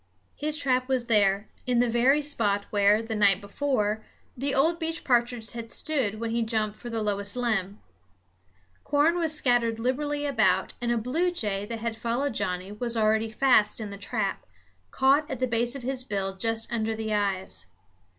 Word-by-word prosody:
His 305 +1 +1
trap 255 -3 +1
was 255 -2 +1
there, 205 -3 +2 0.2
in 250 -1 +1
the 245 +1 +3
very 255 +6 +3
spot 205 -8 0
where, 205 +1 +3
the 225 0 -5
night 200 -3 +4
before, 215 0 -1 0.3
the 275 +2 -1
old 325 +5 +3
beech 325 0 -3
partridge 240 -3 +1
had 230 -1 -7
stood 245 -8 0
when 230 0 -3
he 235 +1 0
jumped 220 -2 -1
for 240 - -9
the 225 -2 -2
lowest 200 0 -2
limb. 215 -5 -1 1.0
Corn 300 +4 +2
was 320 -2 +1
scattered 240 -4 +2
liberally 290 +5 -1
about, 215 -9 +1
and 240 0 0
a 240 - +1
bluejay 240 - -1
that 230 0 -5
had 230 -1 -2
followed 235 +4 -2
Johnnie 185 -1 -3
was 235 +2 -2
already 220 0 +2
fast 220 -2 +3
in 215 -2 -5
the - - -6
trap, 200 - -3 0.5
caught 275 +3 +2
at 265 - -3
the 255 - 0
base 240 +1 0
of 275 - -7
his 260 0 0
bill 195 -4 -3
just 225 +3 -1
under 220 -1 -1
the 220 -1 -3
eyes. 200 -2 -2
230 Hz, 180 wpm, -26 LUFS, 210-260 Hz, 1.0 s, night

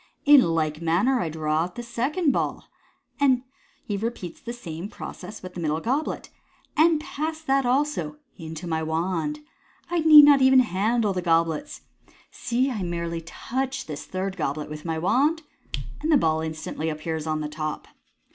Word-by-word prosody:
" - - -43
In 275 - +9
like 160 -4 0
manner 185 +11 +2
I 170 - -1
draw 155 0 -1
out 180 - -10
the 240 - -5
second 275 +8 0
ball" - - -2 1.2
(he 205 - -2
repeats 200 -5 -5
the 235 - -6
same 180 -5 -7
process 215 -1 -9
with 185 0 -8
the 180 - -7
middle 155 -1 0
goblet), 265 - -2 0.4
"and 320 0 +4
pass 310 +1 -4
that 270 -3 +2
also 295 +3 0 0.2
into 160 -1 -7
my 160 -2 -1
wand. 175 - -2 0.5
I 350 - +2
need 305 -2 +10
not 285 -2 +6
even 260 0 +7
handle 215 0 +1
the 180 - -2
goblets. 165 - 0 0.5
See, 255 +3 0
I 215 -5 -3
merely 170 -1 -3
touch 265 +10 -4
this 150 -2 -7
third 190 +1 -3
goblet 150 -1 -3
with 150 +1 -8
my 160 -1 -2
wand, 285 - +2 0.6
and 315 +2 0
the 300 - +7
ball 160 -8 +1
instantly 160 0 -4
appears 160 0 -4
on 155 0 -1
the 150 - -2
top." 155 0 -5
185 Hz, 165 wpm, -25 LUFS, 160-265 Hz, 1.2 s, need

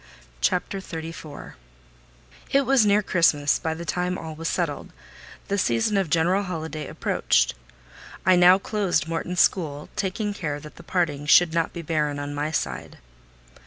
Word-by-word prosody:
CHAPTER 180 - 0
XXXIV 165 -4 -8 1.0
It 275 0 +3
was 255 -4 +4
near 205 +1 +4
Christmas 150 -6 +2
by 160 -1 -2
the 170 +1 -7
time 180 +3 -1
all 160 -1 -7
was 165 +1 -5
settled: 165 -5 -2 0.6
the 200 0 0
season 120 - +1
of 195 -4 +1
general 175 +5 +2
holiday 160 -5 -5
approached. - - +1 0.7
I 185 0 +6
now 180 +1 +7
closed 195 -6 -1
Morton 165 +2 -3
school, 155 -5 +1
taking 205 +1 -2
care 150 -7 -4
that 150 +1 -13
the - - -10
parting 160 -5 -1
should 170 +1 +6
not 165 -1 0
be 170 - -7
barren 150 -2 -1
on 145 0 -5
my 145 +1 -2
side. 155 - -4
165 Hz, 155 wpm, -24 LUFS, 155-185 Hz, 1.0 s, now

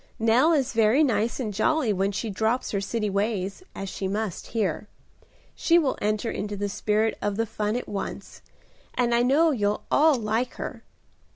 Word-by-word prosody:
Nell 230 +8 +4
is 275 -5 +1
very 225 +6 +4
nice 230 -3 0
and 220 -5 -3
jolly 235 +2 +1
when 195 +1 0
she 215 +2 -3
drops 220 +5 0
her 200 - -1
city 210 +2 -2
ways, 200 - -1
as 195 - -5
she 190 +1 -4
must 205 -1 -3
here. 205 -4 -2 0.7
She 335 - +3
will 295 -6 +2
enter 215 +2 0
into 205 0 -4
the 205 0 -2
spirit 215 +2 0
of 205 -1 -1
the 225 +2 0
fun 210 0 -2
at 245 - -3
once, 200 -1 -6 0.5
and 240 -1 +1
I 235 - +4
know 290 +7 +4
you'll 210 -5 0
all 310 0 +5
like 230 +1 -1
her. - - -6
220 Hz, 180 wpm, -25 LUFS, 205-245 Hz, 0.7 s, all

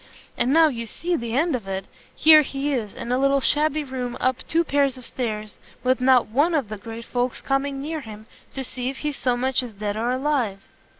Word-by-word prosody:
and 250 - +1
now 325 +2 +6
you 235 -5 -4
see 345 +10 -2
the 235 -6 -3
end 320 0 +2
of 225 -6 -6
it! 190 0 -3 0.3
here 310 -1 +8
he 280 0 -2
is, 220 -6 -3
in 235 +1 -5
a 250 - +2
little 275 0 +3
shabby 300 +2 +1
room 255 -3 -4
up 255 -1 +1
two 335 +1 +2
pairs 280 -4 +1
of 250 - -10
stairs, 215 -4 -4 0.2
with 255 0 +2
not 255 -1 +5
one 290 +9 +2
of 270 -9 0
the 215 - -5
great 225 +2 -8
folks 245 0 -1
coming 275 0 -1
near 310 +2 -4
him, 215 -3 -10 0.3
to 270 - -4
see 250 0 -4
if 270 - -6
he's 295 -2 -1
so 250 -2 0
much 260 +1 +1
as 245 -3 -7
dead 205 0 -3
or 230 +3 -1
alive." 255 -7 0
255 Hz, 225 wpm, -24 LUFS, 230-285 Hz, 0.3 s, here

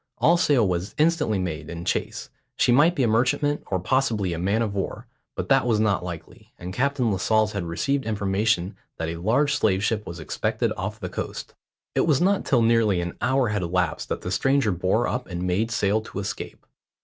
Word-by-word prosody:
All 170 - +4
sail 145 - +3
was 90 +2 -3
instantly 150 -8 +2
made 90 -4 -4
in 85 0 -6
chase - - -3 0.3
she - - +3
might 150 +8 +5
be 135 - +1
a - - +3
merchantman, 125 +6 +1
or 95 - -1
possibly 110 -3 0
a 85 - -4
man 100 +6 +1
of 105 -3 -3
war; 100 -2 -4 0.3
but - - -4
that - - +4
was 110 -3 +2
not 105 -4 +1
likely, 85 -2 -9
and 90 +1 -7
Captain 130 -1 +1
Lascelles 110 +2 +2
had 100 -4 -3
received 135 +12 -1
information 100 -2 0 0.2
that 80 0 -3
a 85 - -4
large 125 - +2
slave 100 -8 +1
ship 105 0 -1
was 85 0 -7
expected 75 - -1
off 105 +3 -5
the 90 - -4
coast. 90 - -6 0.4
It - - +1
was 150 -5 +3
not 195 +2 +2
till 120 -4 +3
nearly 115 -5 +3
an 85 0 -4
hour 130 -3 +2
had 105 -2 -1
elapsed 90 -2 -1
that - - -3
the 90 - -5
stranger 135 +3 +2
bore 95 +6 +1
up 125 0 -3
and 90 -1 -4
made 95 +5 0
sail 110 -1 +1
to 110 - -10
escape. 100 0 -6
105 Hz, 205 wpm, -24 LUFS, 90-125 Hz, 0.4 s, might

